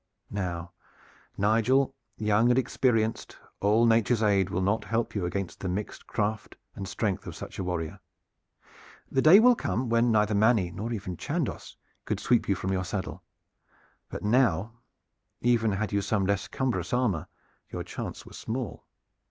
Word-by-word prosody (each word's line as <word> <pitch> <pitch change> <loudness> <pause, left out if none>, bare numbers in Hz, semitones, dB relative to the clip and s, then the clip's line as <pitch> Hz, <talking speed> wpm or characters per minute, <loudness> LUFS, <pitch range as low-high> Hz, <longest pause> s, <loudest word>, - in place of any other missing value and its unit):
Now, 90 -3 -3 0.7
Nigel, 115 +7 +3 0.2
young 110 +2 +3
and 125 - +4
inexperienced, 115 -3 0 0.2
all 105 +4 +4
Nature's 115 0 +3
aid 100 -3 +3
will 95 0 -1
not 100 +3 +1
help 115 +3 -1
you 95 -4 -1
against 95 0 -4
the 95 - -3
mixed 100 +3 -5
craft 110 0 -2 0.2
and 95 - -6
strength 100 -1 -2
of - - -6
such - - -8
a - - -1
warrior. 90 +1 -3 1.1
The 135 - +2
day 165 +8 +9
will 245 +2 +7
come 130 - -2
when 115 +1 +3
neither 105 -1 +3
Manny 105 -3 +3
nor 105 +6 -5
even 95 -6 -4
Chandos - - -3 0.3
could - - -2
sweep 120 -3 +2
you 100 - +3
from 95 - -3
your 95 -1 0
saddle; 95 +1 -4 0.9
but - - -6
now, 110 -3 +2 0.7
even 115 -3 +2
had 105 +2 -2
you 100 - +2
some 100 0 0
less 100 0 0
cumbrous 130 -2 -2
armor, 120 -11 +1 0.4
your - - -4
chance - - -6
were - - -13
small. 120 0 -5
105 Hz, 160 wpm, -28 LUFS, 95-115 Hz, 1.1 s, day